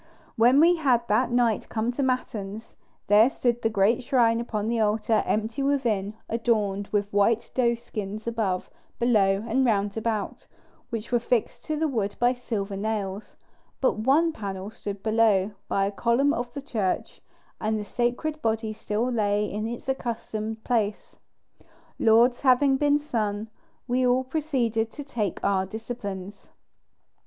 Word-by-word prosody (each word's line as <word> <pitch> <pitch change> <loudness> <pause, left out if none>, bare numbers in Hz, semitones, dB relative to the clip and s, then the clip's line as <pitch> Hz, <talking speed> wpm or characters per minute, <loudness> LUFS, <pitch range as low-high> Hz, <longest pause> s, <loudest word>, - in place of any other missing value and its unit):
When 245 +5 +5
we 340 +3 +5
had 250 -6 +2
that 220 +5 +3
night 240 -3 +1
come 225 +2 -1
to 245 - -3
matins, 225 -5 -3 0.3
there 215 +4 +6
stood 240 -3 -1
the 225 - +1
great 220 +4 +2
shrine 235 -3 +2
upon 215 -3 -3
the 230 0 0
altar, 215 0 +2
empty 220 +5 -1
within, 230 -8 0
adorned 210 -4 0
with 205 -1 -1
white 205 +3 +2
doeskins 225 -4 -2
above, 220 -6 -1 0.3
below, 205 -4 +2
and 260 +4 +2
round 205 -4 +1
about, 220 -2 -3 0.4
which 230 -1 -5
were 240 - +3
fixed 235 -1 -1
to 310 - -1
the 320 +1 +1
wood 215 -8 -2
by 245 +1 +3
silver 215 -5 -4
nails; 205 -1 -3 0.4
but 260 - +1
one 290 +9 +3
panel 195 -2 -5
stood 200 -2 -7
below, 215 -3 +3 0.2
by 195 - +1
a 200 - -1
column 240 +7 +2
of 240 -3 -3
the 280 - -5
church, 215 -9 -2 0.4
and 220 0 0
the 210 - -5
sacred 250 +8 -2
body 220 -1 -1
still 215 +2 -2
lay 210 -2 +1
in 210 +2 -3
its 235 +2 -7
accustomed 225 -4 -3
place. 215 -4 -1 0.8
Lauds 235 +2 +4
having 270 +1 +4
been 290 +1 +3
sung, 220 -7 -2 0.4
we 255 +1 +1
all 250 +1 +3
proceeded 255 -6 -1
to 290 - -7
take 220 - -3
our 195 -1 +2
disciplines. 205 -3 -7
225 Hz, 150 wpm, -26 LUFS, 210-245 Hz, 0.8 s, there